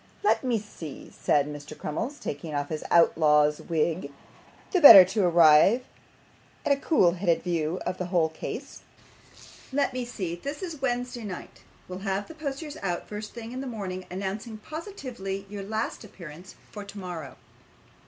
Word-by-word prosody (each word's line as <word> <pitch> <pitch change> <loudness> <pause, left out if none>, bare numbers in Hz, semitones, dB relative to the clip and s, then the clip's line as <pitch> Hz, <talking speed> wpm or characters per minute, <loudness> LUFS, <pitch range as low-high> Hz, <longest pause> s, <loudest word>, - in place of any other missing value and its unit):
'Let 415 - +3
me 250 -3 +1
see,' 175 -8 -9
said 145 -1 +2
Mr. 145 +1 -8
Crummles, 230 - -4
taking 150 - -5
off 145 0 -2
his 155 -1 -4
outlaw's 150 -3 +4
wig, 160 -2 -1 0.6
the 370 - +2
better 195 - +12
to 195 +3 0
arrive 170 +7 +6 0.8
at - - +2
a - - +6
cool 275 - +3
headed 175 -1 0
view 170 -1 -1
of 180 +1 -3
the 180 - -2
whole 175 -3 +2
case. 160 - -7 0.9
'Let 275 0 +1
me 255 -1 -2
see. 200 -8 -4
This 285 - -6
is 325 -6 -6
Wednesday 245 -2 -2
night. 195 -4 -8 0.3
We'll 185 0 -6
have 195 +1 -2
posters 295 +1 -5
out 175 -3 -2
the - - -21
first 210 +1 -7
thing 230 -1 -7
in 255 +1 -5
the 270 - -5
morning, 185 -6 -5
announcing 200 +4 -5
positively 250 - -6
your 200 0 -7
last 220 +4 -3
appearance 180 -3 -11 0.2
for 210 - -7
tomorrow. 180 -8 -8
195 Hz, 160 wpm, -27 LUFS, 170-240 Hz, 0.9 s, better